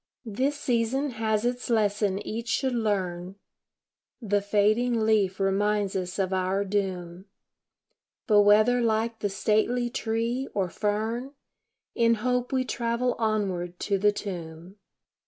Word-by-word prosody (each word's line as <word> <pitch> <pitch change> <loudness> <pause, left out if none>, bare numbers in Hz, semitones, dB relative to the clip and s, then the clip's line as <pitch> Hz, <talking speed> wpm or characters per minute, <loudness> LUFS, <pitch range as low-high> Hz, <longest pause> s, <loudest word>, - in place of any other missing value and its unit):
This 265 +7 -1
season 255 +3 0
has 220 -1 -1
its 245 +1 -2
lesson 205 -3 +1
each 230 +2 -4
should 260 +2 0
learn 190 -5 -2 0.8
The 205 -4 0
fading 215 +4 +2
leaf 210 -4 +2
reminds 200 +1 +1
us 180 -1 -3
of 190 -1 0
our 190 +2 0
doom; 185 -3 -3 1.0
But 210 -3 +5
whether 215 +4 +5
like 225 0 0
the 205 - -1
stately 220 +5 +1
tree, 235 +3 -2
or 190 -3 0
fern, 220 - -2 0.6
In 230 0 +3
hope 250 +2 -1
we 260 -1 +1
travel 240 +1 -1
onward 190 -6 -1
to 200 -1 0
the 205 +1 +4
tomb. 175 -2 -7
215 Hz, 125 wpm, -26 LUFS, 195-235 Hz, 1.0 s, But